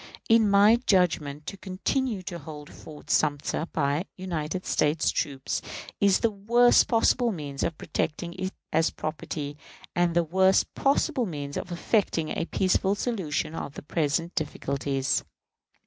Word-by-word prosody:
In 225 Hz, -2 st, +5 dB
my 205 Hz, +3 st, +6 dB
judgment, 155 Hz, -6 st, +2 dB
to 195 Hz, -, -6 dB
continue 200 Hz, +3 st, -2 dB
to 175 Hz, -1 st, -6 dB
hold 150 Hz, -1 st, -10 dB
Fort 150 Hz, -1 st, -10 dB
Sumter, 150 Hz, +2 st, +1 dB
by 145 Hz, +3 st, 0 dB
United 180 Hz, -1 st, -3 dB
States 150 Hz, +1 st, +1 dB
troops, 135 Hz, -2 st, -2 dB, 0.4 s
is 200 Hz, -2 st, +4 dB
the 230 Hz, -, +2 dB
worst 235 Hz, +4 st, +4 dB
possible 235 Hz, +1 st, +3 dB
means 145 Hz, -7 st, -5 dB
of 165 Hz, -2 st, -1 dB
protecting 165 Hz, +3 st, -3 dB
it 185 Hz, +1 st, -4 dB, 0.2 s
as 160 Hz, +1 st, +3 dB
property, 150 Hz, -1 st, -5 dB, 0.4 s
and 175 Hz, -1 st, +2 dB
the 170 Hz, -, +4 dB
worst 190 Hz, +4 st, +3 dB
possible 275 Hz, -2 st, +1 dB
means 145 Hz, -4 st, -5 dB
for 180 Hz, -, -5 dB
effecting 175 Hz, -3 st, 0 dB
a 165 Hz, -, -2 dB
peaceful 190 Hz, +2 st, +1 dB
solution 190 Hz, -10 st, -2 dB
of 145 Hz, -, -6 dB
present 165 Hz, +2 st, 0 dB
difficulties. 140 Hz, -3 st, -1 dB
170 Hz, 135 wpm, -27 LUFS, 150-200 Hz, 0.4 s, my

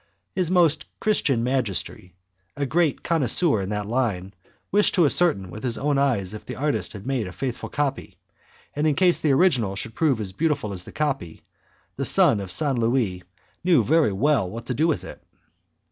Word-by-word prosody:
His 180 Hz, -3 st, 0 dB
Most 170 Hz, -4 st, +2 dB
Christian 140 Hz, -, +1 dB
Majesty, 110 Hz, -8 st, -2 dB, 0.4 s
a 140 Hz, -, -1 dB
great 160 Hz, 0 st, 0 dB
connoisseur 155 Hz, -, +3 dB
in 95 Hz, -, -5 dB
that 105 Hz, -1 st, -3 dB
line, 105 Hz, -5 st, -2 dB, 0.4 s
wished 205 Hz, +1 st, +2 dB
to 175 Hz, -4 st, +4 dB
ascertain 140 Hz, -, +3 dB
with 110 Hz, -, -9 dB
his 125 Hz, -3 st, 0 dB
own 145 Hz, -1 st, 0 dB
eyes 115 Hz, -9 st, 0 dB
if 110 Hz, -, -8 dB
the -, -, -7 dB
artist 125 Hz, -9 st, -2 dB
had 100 Hz, -1 st, -10 dB
made 130 Hz, -6 st, -2 dB
a -, -, -7 dB
faithful 125 Hz, +5 st, -5 dB
copy; 140 Hz, -1 st, -3 dB, 0.6 s
and 150 Hz, +2 st, 0 dB
in 150 Hz, -, +1 dB
case 180 Hz, +1 st, +3 dB
the 150 Hz, -, +1 dB
original 135 Hz, -, +2 dB
should 115 Hz, +3 st, -5 dB
prove 140 Hz, -3 st, +1 dB
as 95 Hz, -3 st, -5 dB
beautiful 145 Hz, -, -1 dB
as 90 Hz, -1 st, -5 dB
the -, -, -11 dB
copy, 140 Hz, -, -3 dB, 0.5 s
the -, -, -2 dB
son 105 Hz, -, +4 dB
of 95 Hz, -2 st, -7 dB
St. 135 Hz, -, 0 dB
Louis 115 Hz, -6 st, 0 dB, 0.4 s
knew 170 Hz, -9 st, +3 dB
very 155 Hz, -1 st, +2 dB
well 115 Hz, -1 st, +1 dB
what 115 Hz, +5 st, -8 dB
to 125 Hz, -, -2 dB
do 155 Hz, +6 st, +1 dB
with 160 Hz, -, -1 dB
it. -, -, -11 dB
130 Hz, 190 wpm, -23 LUFS, 105-150 Hz, 0.6 s, to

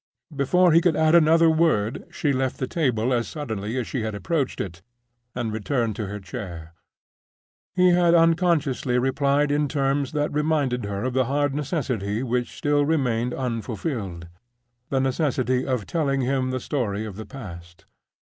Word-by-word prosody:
Before 175 Hz, +6 st, +3 dB
he 165 Hz, +2 st, +6 dB
could 175 Hz, -3 st, +2 dB
add 160 Hz, +1 st, +3 dB
another 165 Hz, 0 st, +6 dB
word 155 Hz, -8 st, +1 dB
she 145 Hz, -2 st, -1 dB
left 130 Hz, 0 st, -1 dB
the 130 Hz, -, -2 dB
table 125 Hz, -5 st, 0 dB
as 120 Hz, -1 st, 0 dB
suddenly 110 Hz, -6 st, -4 dB
as 125 Hz, -, -1 dB
she 130 Hz, -, -3 dB
had 110 Hz, -1 st, -3 dB
approached 145 Hz, -, -2 dB
it, 85 Hz, -3 st, -5 dB, 0.5 s
and 120 Hz, -3 st, -2 dB
returned 115 Hz, 0 st, -1 dB
to 105 Hz, -, -3 dB
her 105 Hz, +1 st, -5 dB
chair. 90 Hz, -4 st, -8 dB, 1.0 s
He 180 Hz, -1 st, +5 dB
had 175 Hz, -1 st, +4 dB
unconsciously 160 Hz, -6 st, +2 dB
replied 140 Hz, +3 st, +1 dB
in 145 Hz, 0 st, +1 dB
terms 140 Hz, -1 st, 0 dB
that 150 Hz, -1 st, -1 dB
reminded 145 Hz, -6 st, 0 dB
her 100 Hz, 0 st, -3 dB
of 130 Hz, 0 st, -1 dB
the 130 Hz, 0 st, +2 dB
hard 145 Hz, +2 st, 0 dB
necessity 130 Hz, -, -2 dB
which 125 Hz, -1 st, -2 dB
still 145 Hz, 0 st, +2 dB
remained 125 Hz, -6 st, 0 dB
unfulfilled—the 120 Hz, -, -5 dB
necessity 130 Hz, -2 st, 0 dB
of 125 Hz, -6 st, -1 dB
telling 140 Hz, -5 st, 0 dB
him 130 Hz, 0 st, 0 dB
the 130 Hz, 0 st, -2 dB
story 110 Hz, -7 st, -2 dB
of 105 Hz, -3 st, -7 dB
the 110 Hz, +2 st, -8 dB
past. 85 Hz, -7 st, -10 dB
130 Hz, 155 wpm, -24 LUFS, 110-150 Hz, 1.0 s, he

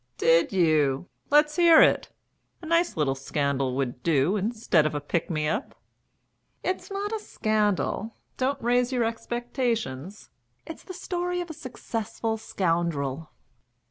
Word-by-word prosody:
"Did 165 Hz, +1 st, +4 dB
you? 155 Hz, -4 st, +2 dB, 0.2 s
Let's 300 Hz, +2 st, +4 dB
hear 335 Hz, -2 st, +7 dB
it. -, -, +4 dB, 0.5 s
A 340 Hz, -, -11 dB
nice 335 Hz, -, +1 dB
little 145 Hz, -3 st, +2 dB
scandal 135 Hz, -1 st, -1 dB
would 125 Hz, -2 st, -2 dB
do 155 Hz, +5 st, +2 dB
instead 205 Hz, -7 st, +1 dB
of 155 Hz, -, -4 dB
a -, -, 0 dB
pick 145 Hz, +3 st, -2 dB
me 155 Hz, -3 st, -1 dB
up." 215 Hz, -, -2 dB, 0.9 s
"It's 370 Hz, +3 st, -2 dB
not 405 Hz, +2 st, -3 dB
a 440 Hz, -, -1 dB
scandal. 215 Hz, -, -1 dB, 0.2 s
Don't 265 Hz, +2 st, -1 dB
raise 245 Hz, +1 st, +2 dB
your 250 Hz, -2 st, +1 dB
expectations. 230 Hz, -, -3 dB, 0.3 s
It's 325 Hz, -, -9 dB
the 370 Hz, -, -9 dB
story 355 Hz, 0 st, -2 dB
of 350 Hz, -2 st, -4 dB
a -, -, -7 dB
successful 225 Hz, -5 st, -4 dB
scoundrel." 165 Hz, -7 st, -1 dB
215 Hz, 140 wpm, -26 LUFS, -, 0.9 s, hear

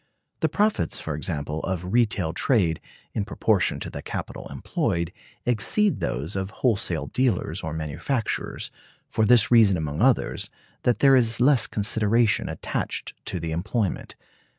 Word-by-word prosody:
The -, -, +1 dB
profits, 210 Hz, -, +1 dB
for 80 Hz, -, -4 dB
example, 75 Hz, 0 st, -3 dB
of 90 Hz, +2 st, -3 dB
retail 105 Hz, -8 st, +1 dB
trade, 90 Hz, -, +1 dB, 0.3 s
in 105 Hz, -, -1 dB
proportion 105 Hz, -1 st, +1 dB
to -, -, -4 dB
the -, -, -6 dB
capital -, -, -6 dB
employed, 85 Hz, +1 st, -2 dB, 0.3 s
exceed 125 Hz, -, +2 dB
those 70 Hz, +10 st, -2 dB
of 95 Hz, 0 st, -2 dB
wholesale 100 Hz, -8 st, 0 dB
dealers 125 Hz, -7 st, 0 dB
or 80 Hz, -, -4 dB
manufacturers, 80 Hz, -, -3 dB, 0.4 s
for 110 Hz, -, +2 dB
this 120 Hz, -2 st, +5 dB
reason 110 Hz, -6 st, +6 dB
among 75 Hz, -2 st, -3 dB
others, -, -, +2 dB, 0.4 s
that 125 Hz, -, +2 dB
there 135 Hz, -1 st, +7 dB
is 115 Hz, -2 st, +3 dB
less 130 Hz, -1 st, +5 dB
consideration 110 Hz, +2 st, +2 dB
attached -, -, -4 dB
to 90 Hz, -, -3 dB
the 80 Hz, 0 st, -4 dB
employment. 100 Hz, +4 st, -2 dB
100 Hz, 140 wpm, -25 LUFS, 85-120 Hz, 0.4 s, there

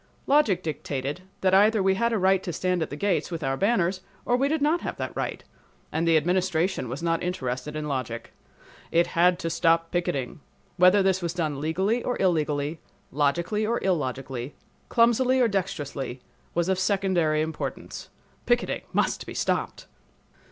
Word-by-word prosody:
Logic 250 Hz, -11 st, +3 dB
dictated 145 Hz, 0 st, -4 dB, 0.2 s
that 185 Hz, -1 st, +2 dB
either 210 Hz, +1 st, +5 dB
we 190 Hz, 0 st, +4 dB
had 235 Hz, +5 st, +1 dB
a 225 Hz, -, +1 dB
right 190 Hz, 0 st, +3 dB
to 185 Hz, -, -4 dB
stand 180 Hz, +1 st, -1 dB
at -, -, -2 dB
the -, -, -5 dB
gates 195 Hz, +4 st, 0 dB
with 165 Hz, -3 st, -5 dB
our 135 Hz, -1 st, 0 dB
banners 190 Hz, -, +1 dB, 0.2 s
or 245 Hz, -, +2 dB
we 270 Hz, +3 st, +2 dB
did 315 Hz, +2 st, 0 dB
not 305 Hz, +4 st, +2 dB
have -, -, -4 dB
that -, -, -5 dB
right; -, -, -3 dB, 0.5 s
but 160 Hz, +1 st, 0 dB
the 165 Hz, -1 st, +5 dB
Administration 175 Hz, -3 st, 0 dB
was 135 Hz, +7 st, -5 dB
not 165 Hz, -1 st, +1 dB
interested 150 Hz, -5 st, -3 dB
in 155 Hz, 0 st, -3 dB
logic. 130 Hz, -5 st, -4 dB, 0.6 s
It 170 Hz, +1 st, +3 dB
had 175 Hz, +1 st, +3 dB
to 165 Hz, -2 st, -3 dB
stop 165 Hz, 0 st, +2 dB
picketing. 150 Hz, -7 st, -2 dB, 0.4 s
Whether 185 Hz, +2 st, +6 dB
this 190 Hz, -1 st, +2 dB
was 170 Hz, 0 st, -3 dB
done 155 Hz, -5 st, -2 dB
legally 190 Hz, +10 st, 0 dB
or 245 Hz, -, -2 dB
illegally, 155 Hz, -4 st, 0 dB, 0.3 s
logically 170 Hz, +9 st, 0 dB
or 230 Hz, +2 st, +1 dB
illogically, 135 Hz, -6 st, -2 dB, 0.3 s
clumsily 245 Hz, +2 st, +3 dB
or 245 Hz, -, +5 dB
dexterously, 145 Hz, -, -3 dB, 0.4 s
was 170 Hz, 0 st, +1 dB
of 190 Hz, -1 st, +1 dB
secondary 185 Hz, -6 st, +1 dB
importance. 160 Hz, 0 st, -6 dB, 0.4 s
Picketing 240 Hz, 0 st, +1 dB
must -, -, 0 dB
be -, -, -7 dB
stopped! -, -, -1 dB
175 Hz, 165 wpm, -26 LUFS, 150-195 Hz, 0.6 s, Whether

